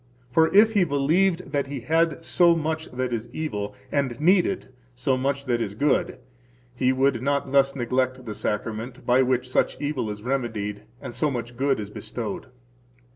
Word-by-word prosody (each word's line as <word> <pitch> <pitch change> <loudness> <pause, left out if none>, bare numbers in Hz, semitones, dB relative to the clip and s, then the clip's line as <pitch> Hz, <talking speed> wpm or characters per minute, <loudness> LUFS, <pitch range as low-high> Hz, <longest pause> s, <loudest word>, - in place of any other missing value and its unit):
For 160 +4 +4
if 215 +3 +6
he 200 -4 +4
believed 165 +3 +1
that 140 -2 0
he 135 -2 -5
had 165 +4 +1
so 170 0 +4
much 160 0 -2
that 125 -1 -2
is 115 0 -3
evil, 105 -10 -4 0.2
and 135 -5 -1
needed 180 -3 +2 0.2
so 130 +1 +1
much 140 +2 -1
that 120 -2 0
is 100 -3 -3
good, 140 +1 +1 0.6
he 125 +1 +2
would 130 -2 +2
not 140 0 0
thus 140 0 +3
neglect 130 0 -1
the 110 - -4
Sacrament, 115 +5 -4
by 125 +1 +4
which 125 -1 +1
such 130 - 0
evil 145 -6 -2
is 105 0 -6
remedied 110 -6 -2 0.2
and - - -7
so 150 - +1
much 120 -2 -5
good 135 0 +1
is 105 -1 -6
bestowed. 110 +1 -5
130 Hz, 175 wpm, -25 LUFS, 120-150 Hz, 0.6 s, if